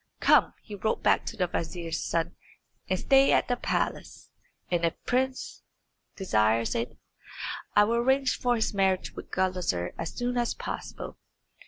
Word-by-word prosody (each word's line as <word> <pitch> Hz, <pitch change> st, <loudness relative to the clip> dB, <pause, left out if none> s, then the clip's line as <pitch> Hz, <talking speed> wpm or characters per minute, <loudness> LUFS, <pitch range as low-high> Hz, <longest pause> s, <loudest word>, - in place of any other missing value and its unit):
"Come," -, -, +4 dB
he 210 Hz, -, -10 dB
wrote 210 Hz, +2 st, -1 dB
back -, -, +3 dB
to 230 Hz, -, -5 dB
the 185 Hz, -, +2 dB
vizier's 165 Hz, -1 st, -3 dB
son, 165 Hz, -1 st, -1 dB, 0.5 s
"and 185 Hz, -, +2 dB
stay 270 Hz, +7 st, +5 dB
at -, -, +3 dB
the 245 Hz, -, +1 dB
palace. -, -, -3 dB, 0.4 s
And 175 Hz, -1 st, +1 dB
if 165 Hz, -, +2 dB
the -, -, -44 dB
prince 260 Hz, +1 st, -1 dB, 0.5 s
desires 110 Hz, -, +2 dB
it, 115 Hz, -, -3 dB, 0.8 s
I 205 Hz, -, +7 dB
will 230 Hz, +3 st, +1 dB
arrange 265 Hz, +2 st, +2 dB
for 245 Hz, -1 st, +2 dB
his 220 Hz, -2 st, 0 dB
marriage 190 Hz, -2 st, +1 dB
with -, -, -9 dB
Gulizar 180 Hz, -, -1 dB
as 165 Hz, -, -3 dB
soon 245 Hz, 0 st, -1 dB
as 240 Hz, -, 0 dB
possible." -, -, -6 dB
190 Hz, 160 wpm, -28 LUFS, 165-245 Hz, 0.8 s, I